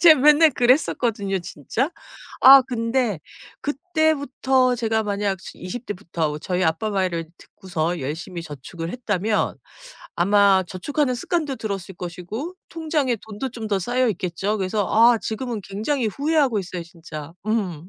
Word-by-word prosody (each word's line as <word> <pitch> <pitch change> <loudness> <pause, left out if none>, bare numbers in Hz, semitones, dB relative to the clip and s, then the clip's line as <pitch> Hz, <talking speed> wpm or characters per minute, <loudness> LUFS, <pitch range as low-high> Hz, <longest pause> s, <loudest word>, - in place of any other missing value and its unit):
제가 320 -4 +8
맨날 300 +2 +7
그랬었거든요 240 -6 +1
진짜. 175 - -3 0.5
아 270 0 +10
근데 230 - -1 0.4
그때부터 280 -4 +1
제가 225 -2 0
만약 200 -2 -1
즈 - - -10
20 220 +7 -6
대부터 165 -6 -3
저희 180 +4 -1
아빠 165 +7 0
말을 180 -5 -1
듣고서 175 -2 -4
열심히 160 +5 -5
저축을 165 +3 -7
했다면 210 -3 -1 0.6
아마 195 +1 +4
저축하는 255 - -1
습관도 295 0 -1
들었을 195 -3 -5
것이고 180 - -6
통장에 305 -6 -1
돈도 220 +4 -6
좀 225 -2 -6
더 200 -2 0
쌓여 245 +6 +1
있겠죠. 195 +2 -2
그래서 195 +1 0
아 230 +2 +5
지금은 230 +1 -4
굉장히 225 +5 -1
후회하고 280 -1 +1
있어요 180 -2 -6
진짜. 165 -3 -9
음. 185 -7 -2
215 Hz, 310 characters per minute, -23 LUFS, 180-255 Hz, 0.6 s, 아